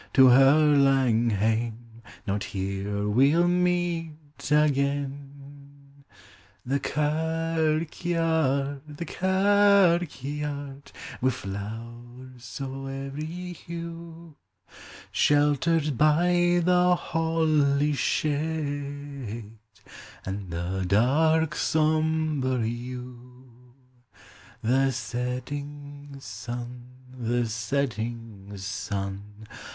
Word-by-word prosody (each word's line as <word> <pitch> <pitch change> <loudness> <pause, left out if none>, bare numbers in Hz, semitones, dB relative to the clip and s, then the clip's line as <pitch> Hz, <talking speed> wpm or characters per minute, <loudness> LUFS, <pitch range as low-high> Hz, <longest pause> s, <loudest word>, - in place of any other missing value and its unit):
to 130 -2 +7
her 145 +4 +6
laug 130 -4 +3
haine: 115 +2 -2 0.2
Not 100 -1 -1
here 100 +1 -3
we 130 +7 +4
'11 175 +1 +3
meet 175 -3 -1 0.3
again. 140 -1 -1 0.9
The 135 +3 0
kirkvaird. 160 +2 0 1.1
the 170 - -4
kirkvaird! 170 -8 +1 0.3
Wi' 130 - +3
llowers 120 +3 -8
o' 135 0 -5
every 155 +7 -5
hue, 170 -1 -9 0.7
Sheltered 150 +1 +2
by 175 +3 +3
the 180 0 +4
holly's 155 -4 +1
shade 145 -6 -3 0.7
An' 95 0 -5
the 85 +3 -3
dark 155 - +3
sombre 155 -5 +1
yew. 125 0 -9 0.9
The 135 +4 +3
setting 140 +4 -5
sun, 120 +2 -7 0.3
the 120 -1 0
setting 115 -3 -3
sun! 100 +2 -5
140 Hz, 70 wpm, -26 LUFS, 120-155 Hz, 1.1 s, to